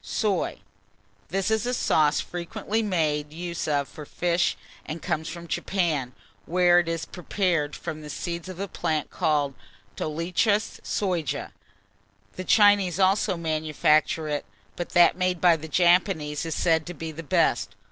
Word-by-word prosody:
] - - -38
SOY. 205 -5 -1 0.7
This 195 +5 -1
is 220 +2 +1
a 250 - 0
sauce 150 -9 +3
frequently 175 +5 -3
made 155 -7 0
use 170 +1 -4
of 145 -2 +1
for 155 - -10
fish, 175 +3 0 0.3
and 155 +2 -6
comes 160 -2 -2
from 170 -1 -8
Japan, 155 -9 -1 0.3
where 175 0 +5
it 175 - -1
is 165 -1 -2
prepared 175 -4 -1
from 155 0 -6
the 150 - -9
seeds 170 +2 -5
of 185 -1 -8
a 200 - -2
plant 155 -5 -2
called 150 -5 +1 0.4
Dolichos 180 +7 0
Soja. 180 -7 -2 0.8
The 185 - -5
Chinese 200 -2 +4
also 190 0 +3
manufacture 155 -1 +1
it; 145 -1 -2 0.3
but 175 - -4
that 175 0 +6
made 185 -1 +1
by 175 -1 +5
the 160 0 -7
Japanese 170 -2 +2
is 160 - -2
said 160 -2 +2
to 175 - -6
be 160 0 -5
the 160 +2 -7
best. 150 - +1
170 Hz, 155 wpm, -26 LUFS, 155-185 Hz, 0.8 s, that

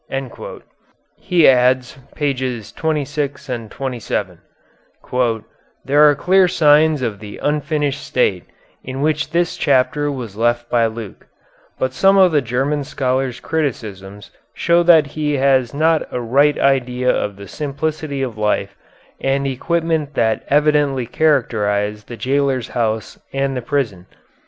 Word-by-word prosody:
He 175 -3 +3
adds 125 -1 +3 0.2
(pp. 130 -6 -3
26 145 -2 -2
and 115 -3 -4
27): 115 -9 -4 1.5
"There 145 +2 +5
are 145 - +2
clear 190 +3 +3
signs 155 -3 +4
of 110 -4 -3
the 105 -1 -9
unfinished 145 -1 -1
state 95 -8 0 0.4
in 130 +1 -5
which 155 0 0
this 170 +1 0
chapter 145 +1 +1
was 120 -7 -6
left 120 +1 0
by 115 -2 +3
Luke; 110 -2 -9 0.5
but 130 0 -1
some 195 +7 +4
of 185 -2 +6
the 150 -2 +3
German 135 +4 -1
scholar's 130 -2 -2
criticisms 105 -10 -4 0.2
show 170 0 +3
that 165 -3 +6
he 150 +1 -2
has 130 -2 +2
not 160 +2 +1
a 125 - -2
right 140 +5 +2
idea 125 -2 +1
of 105 -1 -2
the 100 0 -11
simplicity 150 -1 -3
of 115 -5 -5
life 100 -2 -1 0.5
and 135 +1 0
equipment 160 +2 -1
that 110 -1 +1
evidently 145 -3 +2
characterized 105 -8 0
the 120 - -8
jailer's 135 -2 0
house 110 -3 -2
and 135 0 -1
the 125 - -2
prison. 115 -9 -2
135 Hz, 130 wpm, -19 LUFS, 120-150 Hz, 1.5 s, of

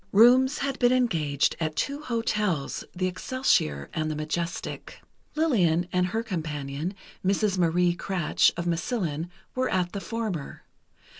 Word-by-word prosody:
Rooms 255 +6 +6
had 275 -1 -2
been 245 -1 +4
engaged 165 - +2
at 155 -2 -2
two 280 - -2
hotels, 210 - -1
the 185 +1 0
Excelsior 185 - 0
and 155 0 -1
the 155 - -2
Majestic. 170 +3 -4 0.4
Lillian 180 - +2
and 180 0 +2
her 225 +5 -2
companion, 155 -3 -4 0.3
Mrs. 195 0 +1
Marie 175 +1 +3
Kratsch, 185 -2 +2
of 170 - -2
Massillon, 170 - -1 0.2
were 255 0 0
at 180 -1 0
the 200 - -5
former. 195 -6 -4
180 Hz, 135 wpm, -27 LUFS, 160-230 Hz, 0.4 s, Rooms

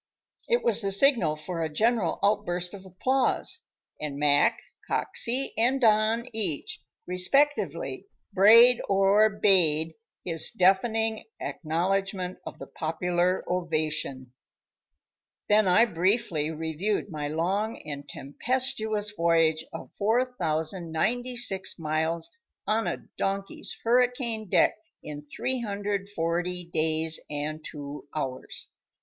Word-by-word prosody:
It 475 0 +1
was 475 - +5
the 200 -1 +1
signal 200 - +4
for 165 +2 -5
a 160 - -1
general 215 +1 +1
outburst 180 -3 0
of 195 -1 -10
applause; 255 +9 0 0.4
and 150 -2 -5
Mac, 145 0 +3 0.3
Coxey 255 +3 +1
and 250 +4 +2
Don, 225 0 +2
each, 195 -9 -1 0.2
respectively, 275 - 0 0.3
brayed 230 +5 +7
or 200 +2 +4
bayed 165 -6 +3 0.3
his 165 -2 -2
deafening 220 +4 +1
acknowledgment 185 +3 -2
of - - -8
the - - -8
popular 175 +3 -1
ovation. 155 -7 -2 1.1
Then 210 -1 +4
I 185 +6 +5
briefly 175 -5 0
reviewed 160 +7 -3
my 150 -2 -4
long 190 +9 -1
and 145 -1 -7
tempestuous 220 - -2
voyage 165 -4 +2
of - - -9
4,096 200 +1 -1
miles 160 +1 -1 0.4
on 220 +1 0
a - - -4
donkey's 195 0 -3
hurricane 240 -3 +1
deck - - +3 0.2
in 150 0 -8
340 200 - -3
days 160 0 +1
and 150 +1 -4
two 145 -1 -8
hours. 135 -4 -4
185 Hz, 105 wpm, -27 LUFS, 160-220 Hz, 1.1 s, brayed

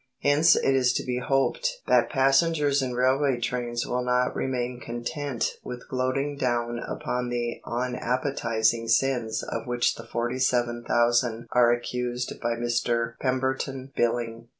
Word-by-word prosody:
Hence 150 +3 +5
it 135 - +2
is 130 -1 +3
to - - -1
be 125 -1 -1
hoped - - 0
that - - +3
passengers 140 +1 +3
in 125 -2 -2
railway 130 +1 +2
trains 120 0 -2
will 125 0 -1
not 125 0 +1
remain 125 -1 -2
content 120 +2 -3
with 125 0 -8
gloating 135 +3 -1
down 120 -2 -1
upon 125 +1 -3
the 120 -1 -3
unappetising 120 -2 0
sins 115 -2 +1
of 115 +1 -5
which 120 0 +1
the - - -11
forty 120 +2 -2
seven 120 -2 +1
thousand 120 -1 +2
are 120 -1 +5
accused 125 +1 -2
by 120 0 0
Mr 120 0 0
Pemberton 130 0 -2
Billing. 115 -1 -1
125 Hz, 140 wpm, -26 LUFS, 120-130 Hz, -, Hence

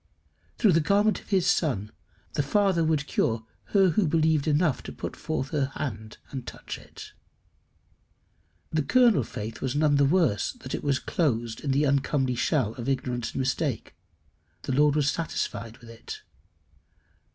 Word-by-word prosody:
Through 215 - +4
the 165 - +4
garment 205 +6 +2
of - - -21
his 190 -4 +2
Son, 110 - +1 0.4
the - - +1
Father 185 +3 +2
would 155 -2 +1
cure 115 -5 0 0.2
her 195 -2 +4
who 180 +2 +2
believed 160 -1 +2
enough 155 -1 +2
to - - -8
put - - -6
forth 155 -4 -3
her 140 -2 0
hand 110 -5 -5
and 130 -3 -6
touch - - -7
it. - - -12 1.6
The 155 - +1
kernel 235 - +4
faith 110 +1 -7
was 130 0 -2
none 145 -1 +3
the 140 - +4
worse 150 - +2
that - - -9
it - - -3
was 140 -2 +2
closed 120 -10 -1
in 145 - -2
the 140 +2 +2
uncomely 140 -2 +1
shell 120 -2 +1
of 120 +3 -3
ignorance 125 -3 -2
and - - -3
mistake. 130 - -2 0.7
The - - -3
Lord 145 +2 +4
was 150 -2 +2
satisfied 120 -8 -3
with 115 -1 -13
it. 425 - -9
145 Hz, 165 wpm, -27 LUFS, 125-160 Hz, 1.6 s, Through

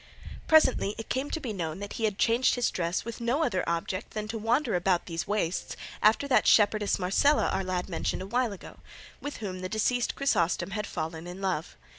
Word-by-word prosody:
Presently 260 -9 +4
it 225 - -7
came 265 +3 -1
to 320 - -2
be 245 -8 -4
known 165 -4 -3
that 205 0 -6
he 225 - -1
had 210 -2 -1
changed 235 +4 +3
his 245 -1 +1
dress 170 +2 -2
with 235 0 -6
no 250 +7 +1
other 185 -10 0
object 170 +5 -3
than 215 0 -3
to 225 - -3
wander 235 +3 +1
about 180 0 +1
these 165 -1 -4
wastes 195 -5 -2 0.2
after 220 +6 +4
that 270 - +3
shepherdess 210 -1 +4
Marcela 195 +11 +3
our 195 - -1
lad 185 -1 -2
mentioned 185 +1 -2
a - - -6
while 240 +3 0
ago, 200 - -11 0.4
with 290 - -5
whom 190 -4 -5
the 185 0 -4
deceased 235 +4 0
Chrysostom 195 -9 +1
had 210 +1 -3
fallen 160 +1 -5
in 180 +2 -8
love. 185 -4 -2
205 Hz, 205 wpm, -28 LUFS, 185-235 Hz, 0.4 s, Presently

